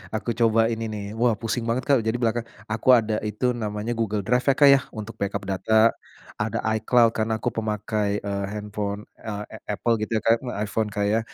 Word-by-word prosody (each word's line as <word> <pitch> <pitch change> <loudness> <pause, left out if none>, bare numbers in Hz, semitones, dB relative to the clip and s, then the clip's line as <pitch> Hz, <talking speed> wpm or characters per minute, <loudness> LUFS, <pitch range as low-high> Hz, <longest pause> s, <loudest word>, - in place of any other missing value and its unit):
Aku 115 +2 -2
coba 115 -1 +3
ini 115 0 -3
nih. 105 -2 -5
Wah 120 -2 +3
pusing 115 +1 -2
banget 120 +2 0
Kak. 140 -3 +4
Jadi 110 +2 -1
belakang 120 -1 0 0.2
aku 110 +4 -2
ada 110 -2 +1
itu 105 +4 0
namanya 105 0 -3
Google 105 -3 -1
Drive 125 +2 +2
ya 135 - +5
Kak 145 -1 +7
ya, 135 -1 +6
untuk 105 -1 -6
backup 100 0 -2
data 110 +4 +3 0.5
ada - - -1 0.2
iCloud 115 +1 +4
karena 110 0 0
aku 120 +1 -2
pemakai, 105 -1 -1
eee, 100 -1 -2
handphone, 105 0 -4 0.2
eee, 105 -1 -5
a 110 - -11 0.2
Apple 120 - +1
gitu 110 +1 0
ya - - -2
Kak 115 0 +4 0.3
iPhone 105 +1 -1
Kak 100 0 -1
ya, 110 +2 +2
110 Hz, 200 wpm, -24 LUFS, 105-115 Hz, 0.5 s, Kak